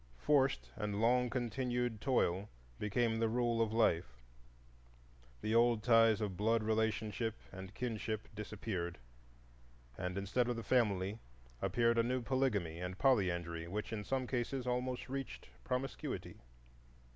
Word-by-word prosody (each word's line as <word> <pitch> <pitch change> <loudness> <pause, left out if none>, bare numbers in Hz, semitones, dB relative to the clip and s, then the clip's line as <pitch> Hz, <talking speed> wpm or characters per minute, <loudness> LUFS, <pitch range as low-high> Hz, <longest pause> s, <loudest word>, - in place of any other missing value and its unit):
Forced 135 - +2
and 105 -2 -2
long 125 +2 +3
continued 125 -2 -1
toil 105 -7 +1 0.3
became 110 +2 +1
the 115 -1 +2
rule 120 0 +1
of 110 -1 +1
life, 85 - +2 1.2
the 110 - -1
old 115 -1 +4
ties 115 -2 +5
of 100 -3 -2
blood 110 +3 +2
relationship 110 0 0 0.2
and 95 +1 -9
kinship 110 -3 -3
disappeared, 100 -4 -4 1.0
and 90 0 -3
instead 105 +5 +1
of 120 - 0
the 115 - -5
family 105 -4 +1 0.4
appeared 115 -1 +2
a - - +5
new 125 +1 0
polygamy 105 -11 0
and 90 +1 -4
polyandry, 85 -10 +1
which, 105 +5 -4
in 105 -2 -3
some 130 +3 -1
cases, 125 +1 -2
almost 125 0 -1
reached 135 - -5
promiscuity. 125 - -3
115 Hz, 130 wpm, -36 LUFS, 100-125 Hz, 1.2 s, ties